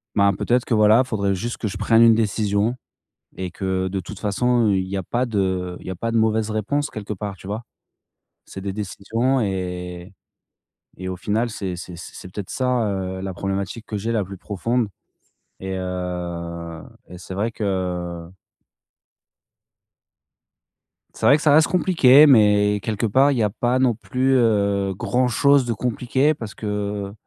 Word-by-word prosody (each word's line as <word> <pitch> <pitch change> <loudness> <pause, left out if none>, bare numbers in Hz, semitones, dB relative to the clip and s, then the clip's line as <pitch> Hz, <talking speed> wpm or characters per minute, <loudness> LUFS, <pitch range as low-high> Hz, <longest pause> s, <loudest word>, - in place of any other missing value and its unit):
ben, 100 -1 +4
peut-être 120 +6 +1
que, 120 - +1
voilà, 110 +3 +5
il - - -15
faudrait 100 -4 0
juste 115 +6 -4
que 110 - -3
je 95 - -6
prenne 115 0 +4
une 115 -1 +7
décision 105 +1 0 0.6
et 95 -1 -4
que 95 0 -2
de 95 +1 -3
toute 95 +3 -8
façon, 120 +2 +1
il 95 -2 +1
y 100 - -4
a - - -1
pas 120 +7 -1
de 95 -5 -1
il - - -13
y - - -3
a 95 - -4
pas 115 +6 -3
de 115 - +1
mauvaises 110 -1 +1
réponses 125 +8 -1
quelque 105 -1 -5
part, 100 0 -5
tu 95 - -13
vois? 105 +4 -4 0.8
C'est 95 - -9
des 100 0 -4
décisions 110 +6 -1
et 90 -2 -4 0.9
et 95 0 -5
au 95 - -3
final, 110 +6 -1
c'est 95 -4 -4
c'est 90 0 -8
c'est 90 +1 -10
peut-être 100 -1 -6
ça, 125 -4 0
heu, 95 -1 -3
la 95 0 -4
problématique 95 +4 -4
que 105 - -4
j'ai 115 +4 -2
la 110 -3 +1
plus 95 +1 -9
profonde 110 +5 -1 0.7
et 95 0 -4
heu, 85 -2 -5 0.3
et 90 - -10
c'est 95 +1 -8
vrai 105 +4 -1
que 90 -5 -3 2.9
c'est - - -1
vrai 140 - +7
que 150 - -5
cela 150 -2 +5
reste 160 +1 +5
compliqué, 155 -5 +6
mais 105 -5 +4
quelque 110 +2 -2
part, 135 +6 +4
il 130 - -1
y - - +2
a 105 - +1
pas 120 +4 0
non 130 -2 +3
plus, 130 +4 0
heu, 100 -5 +2
grand-chose 130 +6 +2
de 115 - -1
compliqué 125 +5 +1
parce 115 -9 -8
que 105 -1 -3
105 Hz, 175 wpm, -22 LUFS, 95-120 Hz, 2.9 s, une